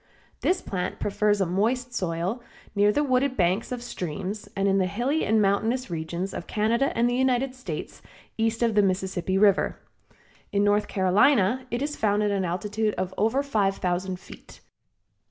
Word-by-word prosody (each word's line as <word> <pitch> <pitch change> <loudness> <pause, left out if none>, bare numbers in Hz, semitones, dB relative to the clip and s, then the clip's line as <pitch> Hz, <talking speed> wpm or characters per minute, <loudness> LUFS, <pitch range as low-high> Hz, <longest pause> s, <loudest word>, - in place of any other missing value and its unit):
This 370 0 0
plant 180 -2 -3
prefers 205 0 +1
a - - +3
moist 235 +8 0
soil 180 +6 -2 0.3
near 205 0 +4
the 295 +7 +1
wooded 260 -1 +1
banks 185 +5 +1
of 245 -1 -4
streams 190 0 -5
and 195 0 +1
in 195 0 +3
the 185 - +2
hilly 245 +11 0
and 220 +1 +2
mountainous 215 +4 +1
regions 170 +3 -3
of 175 - -6
Canada 230 +5 +1
and 235 +1 +3
the 245 - 0
United 255 0 +1
States, 215 -12 -7 0.3
east 225 +1 0
of 230 -1 +2
the 210 - +5
Mississippi 190 -1 0
River. 200 -1 +3 0.7
In 200 0 +2
North 205 +1 +2
Carolina 210 +5 +3
it 240 +3 -2
is 295 +1 -3
found 210 -1 +1
at 205 - +1
an 195 -2 0
altitude 210 +5 -1
of 185 0 -3
over 225 +8 +1
five 205 -8 +1
thousand 180 +1 -2
feet. - - -14
205 Hz, 170 wpm, -26 LUFS, 190-240 Hz, 0.7 s, the